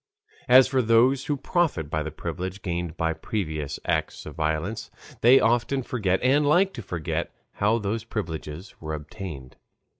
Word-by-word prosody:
As 130 +1 +8
for 130 -1 +2
those 125 +4 +4
who 145 - -1
profit 135 - 0
by 80 - 0
the 75 - -3
privileges 90 +5 -5
gained 85 -4 -4
by 80 0 0
previous 80 -7 -4
acts - - -1
of - - -7
violence, 80 +8 -2 0.3
they 125 +3 +7
often 120 +4 +1
forget 100 -7 0
and 140 +4 +4
like 180 +7 +3
to - - -6
forget 85 -6 -3 0.2
how 105 +3 +1
these 110 +1 -2
privileges 90 -5 -5
were 80 -1 -3
obtained. 75 -4 -8
100 Hz, 155 wpm, -25 LUFS, 80-125 Hz, 0.3 s, As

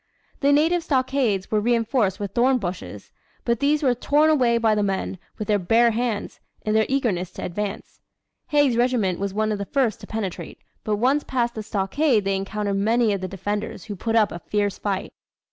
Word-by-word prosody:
The 280 0 +3
native 325 +4 +3
stockades 260 - 0
were 215 - +3
reinforced 230 -3 +1
with 200 -1 -4
thorn 255 +2 +3
bushes, 185 -5 -6 0.3
but 235 -2 +1
these 295 +2 +2
were 255 -3 +4
torn 295 +5 +3
away 245 -6 +3
by 225 -2 +3
the 210 - +1
men, 195 -2 -2 0.2
with 215 - -5
their 210 -1 +2
bare 230 +6 +4
hands, 230 -2 -2 0.3
in 215 - +1
their 220 0 +3
eagerness 220 -10 0
to - - -7
advance. 200 +3 -5 0.5
Haig's 290 -5 +3
regiment 240 -7 +1
was 200 0 -2
one 215 0 +1
of 210 - -2
the 200 - -3
first 235 -3 0
to 205 - -10
penetrate, 210 -5 -5 0.3
but 215 - 0
once 265 +7 +2
past 240 -2 -1
the 220 - -5
stockade 215 +4 +1
they 195 0 +1
encountered 200 +1 -2
many 220 +2 +2
of 195 - -3
the 185 - -3
defenders 205 +3 -4
who 210 - -6
put 225 +4 -2
up 215 -2 +4
a 170 - -6
fierce 205 +2 -1
fight. 195 -2 -3
220 Hz, 195 wpm, -23 LUFS, 200-250 Hz, 0.5 s, were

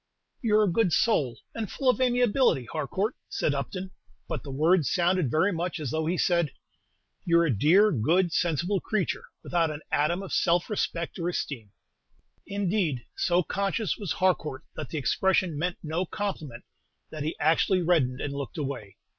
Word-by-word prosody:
"You're 215 -3 +4
a 200 - +2
good 220 -4 +2
soul, 150 - +2 0.2
and 220 -4 -4
full 270 - -3
of 255 0 +4
amiability, 245 - +3
Harcourt," 185 - -2
said 145 - 0
Upton; 185 +7 -4 0.4
but - - -3
the 145 - -10
words 155 +4 +2
sounded 180 -4 +2
very 185 +9 +2
much 175 +1 -3
as 145 -6 -3
though 160 0 -1
he 175 +2 0
said, 170 -4 +2 0.7
"You're 170 -1 +4
a 140 -8 +1
dear, 190 - +5
good, 170 - +2
sensible 175 +4 +1
creature, 215 -5 -1 0.2
without 170 -2 +1
an 150 0 -6
atom 170 +6 +1
of 195 - -7
self 175 +4 +2
respect 170 -4 -2
or 170 +1 -1
esteem." 130 -10 -4 0.8
Indeed, 195 - -1
so 175 0 +2
conscious 200 +3 -1
was 200 -5 -3
Harcourt 170 -7 0
that 150 - -6
the 160 - -4
expression 185 +3 +1
meant 175 +4 -2
no 165 +3 -2
compliment 155 - -4 0.5
that 155 - -6
he 155 +2 -3
actually 180 +3 +3
reddened 145 -7 +2
and 140 - -3
looked 140 +4 -5
away. 135 -9 -5
170 Hz, 165 wpm, -27 LUFS, 150-190 Hz, 0.8 s, dear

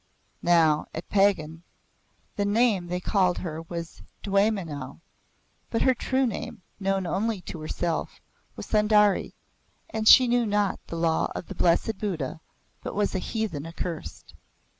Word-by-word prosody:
Now, 160 -3 +3
at 165 - -6
Pagan, 175 -6 +2 0.7
the 205 - 0
name 205 -3 +2
they 180 +1 -2
called 185 -1 +1
her 160 -3 -5
was 170 0 -7 0.2
Dwaymenau, 195 -10 -1 0.7
but 230 - 0
her 260 - +4
true 260 +2 0
name, 220 -5 -5 0.2
known 195 -1 0
only 210 +4 -1
to 165 -1 -8
herself, 165 +2 -3 0.4
was - - -7
Sundari, 210 -1 +3 0.6
and 220 -1 -2
she 255 +2 +9
knew 240 -1 +2
not 205 -2 0
the - - -6
Law 165 -1 +1
of - - -5
the - - -7
Blessed 190 +5 +1
Buddha 165 -7 -3 0.4
but - - -6
was 205 0 0
a 190 - 0
heathen 185 -8 -3
accursed. 165 0 -6
190 Hz, 140 wpm, -26 LUFS, 165-210 Hz, 0.7 s, she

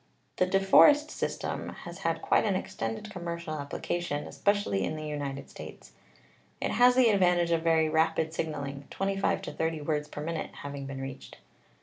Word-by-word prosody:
The 185 - +3
De 195 +1 +3
Forest 295 +10 +6
system - - -3
has - - -8
had - - -1
quite - - +3
an 205 -3 +1
extended 115 - -4
com 180 -4 -7
mercial 170 -2 -4
application, 145 +1 -3
especially 200 - 0
in 155 - -2
the 155 0 -6
United 145 -2 -4
States. - - -11 0.7
It - - -1
has 245 0 +5
the 255 -2 +6
advantage 175 -3 +3
of 165 -1 +2
very 160 -1 +3
rapid 160 0 +1
signaling, 140 -3 -4
25 195 0 0
to 150 - -6
30 160 0 -1
words 150 0 -1
per 150 - -7
minute 165 0 -3
having 140 -1 -6
been 135 -1 -6
reached. 135 0 -8
160 Hz, 175 wpm, -29 LUFS, 145-185 Hz, 0.7 s, Forest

